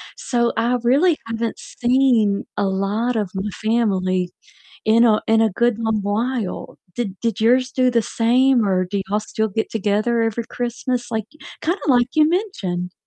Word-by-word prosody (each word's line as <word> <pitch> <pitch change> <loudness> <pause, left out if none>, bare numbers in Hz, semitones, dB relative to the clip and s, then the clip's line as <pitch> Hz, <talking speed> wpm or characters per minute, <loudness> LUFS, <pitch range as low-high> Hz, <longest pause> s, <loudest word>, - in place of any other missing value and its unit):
so 240 -2 0
I 240 +2 +1
really 295 +7 +3
haven't 230 0 -3
seen 240 -5 +1
a - - 0
lot 200 +5 -1
of 205 -4 -2
my 195 +2 -3
family 190 -5 0 0.6
in 230 +2 +5
a 215 -2 +3
in 225 0 +4
a 225 - +3
good 235 +2 +1
long 220 -2 0
while. 220 +1 -3 0.2
Did 205 -5 -3
did 230 -2 -1
yours 255 +3 +3
do 255 -2 +2
the 235 -2 +2
same 240 +1 +2
or 185 -1 +2
do 195 +2 -3
y'all 210 +1 0
still 220 +1 -2
get 220 +2 -3
together 215 +2 0
every 225 +1 -1
Christmas? 245 +1 -3
Like, 220 -2 -2 0.4
kinda 350 +5 -1
like 245 -3 +4
you 305 -1 +4
mentioned. 195 - -2
225 Hz, 165 wpm, -20 LUFS, 205-245 Hz, 0.6 s, in